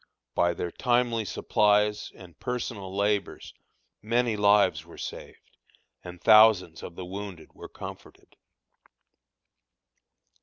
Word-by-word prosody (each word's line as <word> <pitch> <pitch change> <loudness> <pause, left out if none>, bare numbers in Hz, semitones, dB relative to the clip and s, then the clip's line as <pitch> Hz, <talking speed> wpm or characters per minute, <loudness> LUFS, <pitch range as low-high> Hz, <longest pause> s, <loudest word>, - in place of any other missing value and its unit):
By 85 0 +1
their 85 - -4
timely 120 -3 0
supplies 105 +1 +1
and 85 -4 -15
personal 120 -6 -4
labors 100 0 -1 0.5
many 115 +1 0
lives 100 -6 +3
were 85 - -15
saved, - - -9 0.5
and 90 0 -10
thousands 105 -6 +5
of 85 - -9
the 90 - -7
wounded 95 -2 -8
were - - -11
comforted. - - -11
105 Hz, 105 wpm, -27 LUFS, 90-110 Hz, 0.5 s, thousands